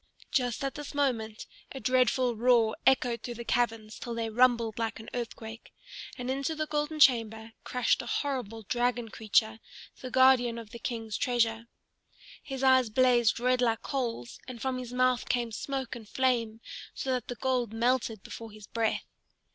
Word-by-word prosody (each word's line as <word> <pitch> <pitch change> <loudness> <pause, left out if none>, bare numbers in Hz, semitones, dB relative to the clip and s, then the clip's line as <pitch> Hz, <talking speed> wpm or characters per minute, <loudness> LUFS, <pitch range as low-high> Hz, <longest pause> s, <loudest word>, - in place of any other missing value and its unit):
Just 245 -1 0
at 275 - -1
this 295 0 -8
moment 230 -6 -1 0.3
a 270 - -6
dreadful 255 0 +2
roar 230 -1 +3
echoed 245 -3 +3
through 240 +1 -6
the 235 +1 -7
caverns 225 -3 -1
till 235 -2 -5
they 225 -1 -2
rumbled 235 -2 +3
like 225 0 -2
an 220 - -10
earthquake, 225 -2 -6 0.5
and 250 +1 -3
into 275 +4 -2
the 310 0 -1
golden 300 +1 -2
chamber 225 -4 +3
crashed 250 -1 +1
a 240 - -9
horrible 240 -6 -2
dragon 240 +1 0
creature, 220 0 +1 0.4
the 255 - -6
guardian 255 -2 +4
of 225 -2 -9
the 235 - -8
King's 225 -3 -4
treasure. 230 -2 0 0.7
His 270 -2 -6
eyes 260 -3 +5
blazed 240 -1 +3
red 250 +1 +2
like 230 -2 +1
coals, 235 - -3
and 250 -2 -7
from 260 +1 -2
his 245 -1 -7
mouth 255 0 +1
came 240 -2 0
smoke 265 +3 -4
and 220 -4 -11
flame 235 -4 0 0.3
so 265 - -2
that 255 -1 -1
the 245 - -4
gold 250 -3 0
melted 230 -2 0
before 225 -1 -8
his 210 -1 -12
breath. 225 0 -1
240 Hz, 170 wpm, -29 LUFS, 225-255 Hz, 0.7 s, eyes